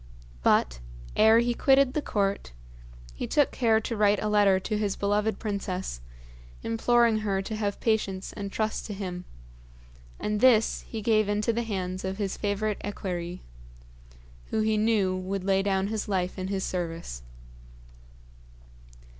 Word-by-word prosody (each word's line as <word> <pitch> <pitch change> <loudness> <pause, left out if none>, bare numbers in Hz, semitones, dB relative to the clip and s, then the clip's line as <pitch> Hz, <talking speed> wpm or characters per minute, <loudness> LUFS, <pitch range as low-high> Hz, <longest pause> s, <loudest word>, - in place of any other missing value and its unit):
But, - - +2 0.4
ere 220 +1 +6
he 240 +1 +2
quitted 270 +1 +4
the 300 - 0
court, 200 - -1 0.6
he - - -5
took 290 -2 +2
care 225 -3 +3
to 230 +1 -3
write 210 -1 +3
a 215 - -1
letter 205 -2 +4
to 215 +3 -3
his 205 -2 -1
beloved 205 +1 0
princess, 190 - -4 0.6
imploring 230 0 +3
her 195 -2 -1
to 220 +3 -4
have 205 -2 -2
patience 200 -4 -1
and 200 -1 -6
trust 215 +1 -2
to 210 - -5
him; 180 -2 -5 0.9
and 210 0 -1
this 230 -2 +4
he 220 -2 -6
gave 215 -2 +3
into 210 +2 +1
the 235 - 0
hands 185 -4 -3
of 190 0 -3
his 200 -2 -2
favourite 205 0 -2
equerry, 180 -3 -5 1.1
who - - -2
would 215 - +2
he 220 0 +2
knew 210 -3 +2
lay 195 +1 0
down 195 -1 0
his 215 +1 -3
life 185 -2 -1
in 185 - -3
his 195 -1 -2
service. 165 - -4
205 Hz, 150 wpm, -27 LUFS, 190-220 Hz, 1.1 s, ere